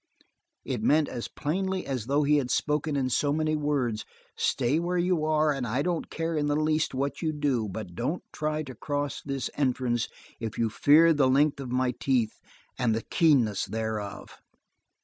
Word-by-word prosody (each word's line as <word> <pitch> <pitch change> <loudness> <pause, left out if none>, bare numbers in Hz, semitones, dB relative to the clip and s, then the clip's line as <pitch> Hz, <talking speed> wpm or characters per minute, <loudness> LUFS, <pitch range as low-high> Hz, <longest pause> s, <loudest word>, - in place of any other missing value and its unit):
It - - -2
meant 150 +1 +3
as 120 - -5
plainly 190 +5 -2
as 125 -5 -3
though 145 +2 +2
he 150 +1 +4
had 130 -4 -1
spoken 150 +1 0
in 130 -2 0
so 145 +3 +2
many 155 +1 +1
words: 140 -7 -1 0.3
"Stay 135 +5 +1
where 175 +1 -1
you 175 -2 +1
are 155 -1 +3
and 130 -3 -3
I 125 +6 0
don't 175 -1 -2
care 165 0 -2
in 145 -1 0
the 145 - +1
least 155 -1 +1
what 140 +2 -2
you 160 -2 0
do, 140 -8 0
but 95 -2 -6
don't 125 - -2
try 155 0 -1
to 130 -3 -8
cross 145 +3 -3
this 135 -2 -3
entrance 125 -4 0 0.3
if 115 -2 -5
you 115 -2 +1
fear 160 +7 +6
the 140 -4 +3
length 140 +2 +3
of 130 -3 -6
my 130 0 +1
teeth 125 -5 0 0.4
and 115 -4 +2
the 115 - -3
keenness 130 - +3
thereof." 110 -2 -4
145 Hz, 185 wpm, -27 LUFS, 125-155 Hz, 0.4 s, fear